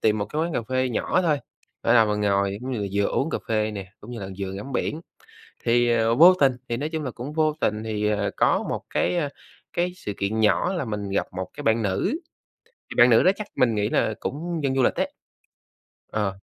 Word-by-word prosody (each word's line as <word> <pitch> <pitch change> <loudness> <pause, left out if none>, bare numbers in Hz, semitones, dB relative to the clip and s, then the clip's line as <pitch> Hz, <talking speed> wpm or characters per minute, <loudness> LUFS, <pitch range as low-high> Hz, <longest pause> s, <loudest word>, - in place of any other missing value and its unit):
tìm 110 -1 +2
một 105 - 0
cái 155 +1 -2
quán 170 +1 -2
cà 120 - -1
phê 130 +2 0
nhỏ 155 +9 0
thôi, 155 -4 +2 0.4
để 115 - +3
là 115 -2 +7
mình 105 -1 -1
ngồi 100 -1 +1
cũng 130 +2 -5
như 120 - -2
là 100 - -1
vừa 100 0 +2
uống 155 - 0
cà - - -1
phê 110 -1 +1
nè, 100 -3 -7
cũng 105 - -11
như 120 -2 -6
là 95 - -5
vừa 95 -1 -3
ngắm 100 +8 -7
biển. 150 +4 -1 0.6
Thì, 120 0 +3
ờ, 115 0 +2
vô 170 +7 +9
tình, 135 -2 +5 0.2
thì, 115 - -1
nói 145 +4 -2
chung 160 -1 -3
là, 130 - -3
cũng 125 +5 -7
vô 155 -1 +2
tình 105 +1 0
thì, 105 -1 -1
ờ, 105 -1 0
có - - +3
một - - -2
cái, 180 - +1
a, 150 -4 0 0.4
cái 175 +1 0
sự 105 - -5
kiện 105 +3 -1
nhỏ 110 - +3
là 175 -7 -2
mình 105 -3 -4
gặp 95 - 0
một 95 -1 -4
cái 145 - -8
bạn 115 -1 +3
nữ, 100 - 0 0.7
thì - - -7
bạn 120 +1 +8
nữ 115 - +6
đó 185 - +6
chắc 210 0 -6
mình 120 -3 +3
nghĩ 105 0 0
là 110 - +1
cũng 165 +3 -4
dân 135 -1 +1
du 135 - +3
lịch - - +3
đấy. - - -1 1.0
Ờ. 100 -3 -1
115 Hz, 245 wpm, -24 LUFS, 105-145 Hz, 1.0 s, vô